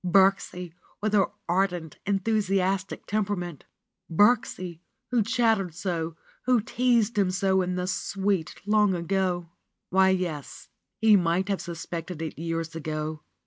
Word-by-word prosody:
Birksie, 180 Hz, -2 st, +2 dB, 0.3 s
with 215 Hz, +1 st, -1 dB
her 200 Hz, -3 st, +5 dB, 0.2 s
ardent, 175 Hz, -3 st, 0 dB
enthusiastic 195 Hz, -2 st, 0 dB
tempera 205 Hz, -1 st, 0 dB
ment! 175 Hz, -5 st, -6 dB, 0.5 s
Birksie, 185 Hz, -3 st, +2 dB, 0.3 s
who 245 Hz, -2 st, +3 dB
chattered 225 Hz, -6 st, +1 dB
so, 165 Hz, -3 st, -2 dB, 0.3 s
who 250 Hz, -2 st, +5 dB
teased 235 Hz, -1 st, +2 dB
him 195 Hz, -2 st, +3 dB
so 190 Hz, 0 st, +2 dB
in 180 Hz, 0 st, -1 dB
the 180 Hz, 0 st, -1 dB
sweet 190 Hz, -1 st, -1 dB
long 210 Hz, -2 st, +3 dB
ago! 175 Hz, -1 st, -1 dB, 0.4 s
Why, 190 Hz, +1 st, +5 dB
yes, 175 Hz, -6 st, -3 dB, 0.3 s
he 220 Hz, -1 st, +6 dB
might 180 Hz, +1 st, +2 dB
have 195 Hz, -, 0 dB
suspected 170 Hz, 0 st, -6 dB
it 160 Hz, -, -6 dB
years 165 Hz, 0 st, -3 dB
ago. 155 Hz, -1 st, -3 dB
190 Hz, 130 wpm, -27 LUFS, 170-205 Hz, 0.5 s, he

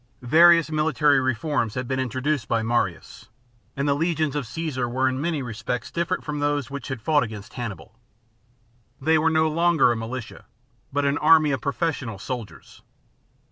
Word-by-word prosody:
^ -, -, -9 dB
Various 165 Hz, +3 st, +6 dB
military 150 Hz, -2 st, +3 dB
reforms 130 Hz, -2 st, -1 dB
had 125 Hz, -1 st, -3 dB
been 130 Hz, +1 st, -1 dB
introduced 130 Hz, +1 st, -1 dB
by 115 Hz, -1 st, 0 dB
Marius; 120 Hz, +1 st, -2 dB, 0.5 s
and 140 Hz, +1 st, -1 dB
the 140 Hz, -, +3 dB
legions 155 Hz, -1 st, -1 dB
of 145 Hz, -5 st, -3 dB
Caesar 130 Hz, -2 st, -3 dB
were 130 Hz, +2 st, +1 dB
in 130 Hz, +1 st, -1 dB
many 155 Hz, -3 st, -1 dB
respects 120 Hz, 0 st, -4 dB
different 170 Hz, +2 st, -2 dB
from 150 Hz, -1 st, -4 dB
those 145 Hz, -2 st, -1 dB
which 140 Hz, -2 st, -6 dB
had 130 Hz, -5 st, -6 dB
fought 150 Hz, +2 st, +3 dB
against 110 Hz, -4 st, -6 dB
Hannibal. 110 Hz, -2 st, -7 dB, 1.1 s
They 160 Hz, +3 st, +3 dB
were 160 Hz, +1 st, +3 dB
no 160 Hz, 0 st, +2 dB
longer 165 Hz, -4 st, +3 dB
a -, -, 0 dB
militia, 115 Hz, +1 st, -7 dB, 0.5 s
but 145 Hz, +1 st, 0 dB
an 140 Hz, +1 st, +1 dB
army 155 Hz, -1 st, +5 dB
of 135 Hz, -, -2 dB
professional 140 Hz, -, -2 dB
soldiers. 115 Hz, +2 st, -8 dB
140 Hz, 170 wpm, -24 LUFS, 120-155 Hz, 1.1 s, Various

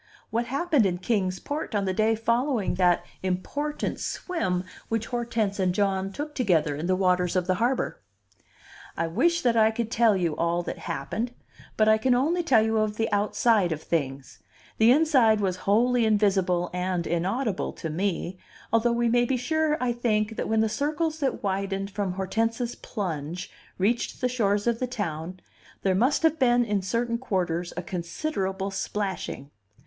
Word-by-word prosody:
What 235 Hz, +1 st, 0 dB
happened 280 Hz, -, +2 dB
in 180 Hz, -1 st, -1 dB
Kings 185 Hz, -2 st, -1 dB
Port 290 Hz, -, -4 dB
on 200 Hz, -1 st, +1 dB
the 190 Hz, -, 0 dB
day 220 Hz, +3 st, +2 dB
following 235 Hz, 0 st, 0 dB
that 180 Hz, -1 st, +2 dB, 0.2 s
important 285 Hz, +12 st, -2 dB
swim 185 Hz, -, -2 dB, 0.3 s
which 225 Hz, -1 st, -1 dB
Hortense 230 Hz, -5 st, -2 dB
and 180 Hz, -1 st, +1 dB
John 195 Hz, -1 st, 0 dB
took 295 Hz, +7 st, -5 dB
together 165 Hz, -, +1 dB
in 155 Hz, +4 st, -3 dB
the 185 Hz, -, +3 dB
waters 180 Hz, -1 st, +1 dB
of 180 Hz, -1 st, +1 dB
the 185 Hz, -, +2 dB
harbor? 245 Hz, +2 st, 0 dB, 1.0 s
I 165 Hz, -, +1 dB
wish 335 Hz, -, +1 dB
that 240 Hz, -2 st, +3 dB
I 220 Hz, -1 st, +5 dB
could 225 Hz, 0 st, -3 dB
tell 220 Hz, -3 st, +4 dB
you 170 Hz, -4 st, 0 dB
all 170 Hz, +1 st, 0 dB
that -, -, -5 dB
happened, 215 Hz, -, -3 dB, 0.4 s
but 215 Hz, -, +4 dB
I 220 Hz, 0 st, +5 dB
can 250 Hz, +2 st, +3 dB
only 320 Hz, +8 st, +2 dB
tell 250 Hz, -10 st, +4 dB
you 220 Hz, 0 st, +1 dB
of 215 Hz, 0 st, -1 dB
the 225 Hz, -1 st, 0 dB
outside 205 Hz, -1 st, +2 dB
of 155 Hz, -1 st, -3 dB
things; 135 Hz, -8 st, -3 dB, 0.4 s
the 225 Hz, +2 st, +6 dB
inside 260 Hz, -7 st, +4 dB
was 190 Hz, -3 st, 0 dB
wholly 240 Hz, +3 st, +3 dB
invisible 190 Hz, -4 st, +2 dB
and 180 Hz, -1 st, -1 dB
inaudible 190 Hz, +6 st, -1 dB
to 160 Hz, -, -5 dB
me, 180 Hz, +1 st, -2 dB, 0.3 s
although 230 Hz, +1 st, +3 dB
we 235 Hz, 0 st, +1 dB
may 240 Hz, +1 st, +3 dB
be 255 Hz, +1 st, 0 dB
sure, 315 Hz, +4 st, +1 dB
I 250 Hz, -1 st, +1 dB
think, 225 Hz, -2 st, 0 dB
that -, -, -3 dB
when 220 Hz, 0 st, +3 dB
the 220 Hz, -, +3 dB
circles 310 Hz, +7 st, -1 dB
that 275 Hz, -3 st, -1 dB
widened 195 Hz, 0 st, -2 dB
from 200 Hz, -2 st, -2 dB
Hortense's 225 Hz, +6 st, -1 dB
plunge 175 Hz, -, -5 dB, 0.3 s
reached 225 Hz, +6 st, 0 dB
the 250 Hz, -, +1 dB
shores 205 Hz, -5 st, 0 dB
of 235 Hz, -1 st, +1 dB
the 255 Hz, -, -1 dB
town, 180 Hz, -6 st, -4 dB, 0.4 s
there 190 Hz, -, +3 dB
must 250 Hz, -, +2 dB
have 320 Hz, -1 st, +3 dB
been 245 Hz, -2 st, +4 dB
in 205 Hz, -3 st, 0 dB
certain 235 Hz, +4 st, -1 dB
quarters 180 Hz, -7 st, -1 dB
a 180 Hz, -, -3 dB
considerable 190 Hz, -, -3 dB
splashing. 190 Hz, -7 st, -4 dB
210 Hz, 175 wpm, -26 LUFS, 185-240 Hz, 1.0 s, the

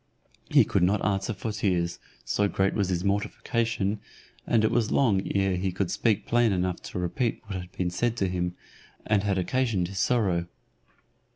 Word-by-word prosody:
He -, -, +6 dB
could -, -, +1 dB
not 95 Hz, +3 st, +2 dB
answer 100 Hz, +1 st, 0 dB
for 110 Hz, +1 st, -4 dB
tears, 90 Hz, -4 st, 0 dB, 0.3 s
so 105 Hz, -, +1 dB
great 95 Hz, 0 st, +1 dB
was 100 Hz, -3 st, 0 dB
his 90 Hz, -1 st, -1 dB
mortification, 105 Hz, +1 st, -1 dB, 0.5 s
and 115 Hz, -2 st, +3 dB
it 110 Hz, -, +3 dB
was 115 Hz, -2 st, +1 dB
long 110 Hz, -9 st, +3 dB
ere 95 Hz, -1 st, +2 dB
he 95 Hz, +1 st, -1 dB
could 95 Hz, 0 st, -2 dB
speak 110 Hz, -4 st, +1 dB
plain 120 Hz, -2 st, +3 dB
enough 90 Hz, -1 st, -1 dB
to -, -, -7 dB
repeat 110 Hz, +7 st, -1 dB
what 95 Hz, -4 st, -4 dB
had 90 Hz, 0 st, -12 dB
been 90 Hz, -1 st, -1 dB
said 120 Hz, +6 st, 0 dB
to 95 Hz, -, +1 dB
him, 90 Hz, -1 st, -2 dB, 0.5 s
and 105 Hz, -2 st, +2 dB
had 100 Hz, -1 st, 0 dB
occasioned 100 Hz, -2 st, 0 dB
his 95 Hz, -1 st, -5 dB
sorrow. 95 Hz, -7 st, +1 dB
100 Hz, 180 wpm, -27 LUFS, 90-110 Hz, 0.5 s, He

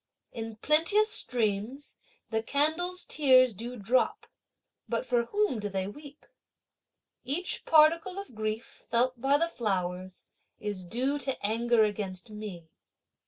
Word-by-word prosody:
In 225 Hz, -1 st, -6 dB
plenteous 330 Hz, -, +3 dB
streams 235 Hz, -, -1 dB, 0.4 s
the 220 Hz, 0 st, +1 dB
candles' 315 Hz, +9 st, 0 dB
tears 255 Hz, -4 st, +5 dB
do 235 Hz, +5 st, -6 dB
drop, 235 Hz, +5 st, +1 dB, 0.6 s
but -, -, -1 dB
for 240 Hz, -1 st, +1 dB
whom 410 Hz, -, 0 dB
do 205 Hz, 0 st, -3 dB
they 190 Hz, -1 st, -2 dB
weep? 285 Hz, +7 st, -11 dB, 1.0 s
Each 345 Hz, +7 st, -3 dB
particle 325 Hz, +4 st, +4 dB
of 395 Hz, -10 st, -7 dB
grief 215 Hz, +1 st, -3 dB, 0.2 s
felt 240 Hz, +1 st, +1 dB
by 275 Hz, +2 st, +4 dB
the 335 Hz, +3 st, +1 dB
flowers 185 Hz, -, -3 dB, 0.3 s
is 205 Hz, -3 st, -4 dB
due 255 Hz, +10 st, -1 dB
to 265 Hz, -5 st, -3 dB
anger 230 Hz, +1 st, +3 dB
against 205 Hz, -1 st, -3 dB
me. 205 Hz, -6 st, -8 dB
240 Hz, 125 wpm, -29 LUFS, 210-295 Hz, 1.0 s, tears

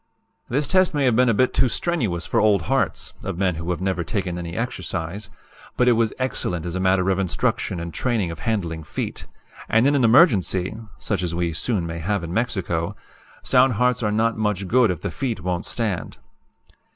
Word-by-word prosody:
"This 140 Hz, +3 st, 0 dB
test 185 Hz, -1 st, +3 dB
may 145 Hz, -2 st, +2 dB
have 125 Hz, -3 st, +3 dB
been 125 Hz, +1 st, +4 dB
a -, -, +4 dB
bit 130 Hz, +4 st, +2 dB
too 130 Hz, -, +3 dB
strenuous 115 Hz, -, -1 dB
for -, -, +1 dB
old 105 Hz, -5 st, +3 dB
hearts -, -, -1 dB
(of -, -, -4 dB
men 95 Hz, -1 st, +1 dB
who 85 Hz, +2 st, -5 dB
had 90 Hz, 0 st, -2 dB
never 95 Hz, -2 st, -1 dB
taken 95 Hz, -2 st, -2 dB
any 85 Hz, 0 st, -6 dB
exercise), 100 Hz, -4 st, -4 dB, 0.5 s
but 125 Hz, -, +3 dB
it -, -, +7 dB
was 115 Hz, -1 st, +2 dB
excellent 105 Hz, -9 st, -2 dB
as 85 Hz, -, -3 dB
a 95 Hz, -, -2 dB
matter 95 Hz, 0 st, +2 dB
of 95 Hz, -, 0 dB
instruction 90 Hz, -1 st, -1 dB
and 85 Hz, 0 st, -6 dB
training 115 Hz, -9 st, 0 dB
of 85 Hz, -, -8 dB
handling 85 Hz, -6 st, -2 dB
feet 75 Hz, -, -5 dB, 0.4 s
and 115 Hz, +3 st, +4 dB
in 140 Hz, -, +4 dB
an 140 Hz, -3 st, +2 dB
emergency 110 Hz, -, +4 dB, 0.2 s
(such 100 Hz, -4 st, -2 dB
as 85 Hz, -2 st, -2 dB
we 85 Hz, -1 st, -1 dB
soon 90 Hz, +1 st, -1 dB
may 85 Hz, 0 st, -5 dB
have 100 Hz, +3 st, -1 dB
in 85 Hz, +1 st, -5 dB
Mexico) 95 Hz, -7 st, -1 dB, 0.5 s
sound 130 Hz, 0 st, +4 dB
hearts 125 Hz, +3 st, +1 dB
are 105 Hz, -2 st, 0 dB
not 115 Hz, +2 st, +1 dB
much 105 Hz, -3 st, -1 dB
good 120 Hz, +1 st, +4 dB
if 90 Hz, -4 st, -2 dB
the -, -, -3 dB
feet 130 Hz, -5 st, -3 dB
won't 90 Hz, 0 st, -2 dB
stand. 105 Hz, -9 st, -3 dB
100 Hz, 200 wpm, -23 LUFS, 85-120 Hz, 0.5 s, it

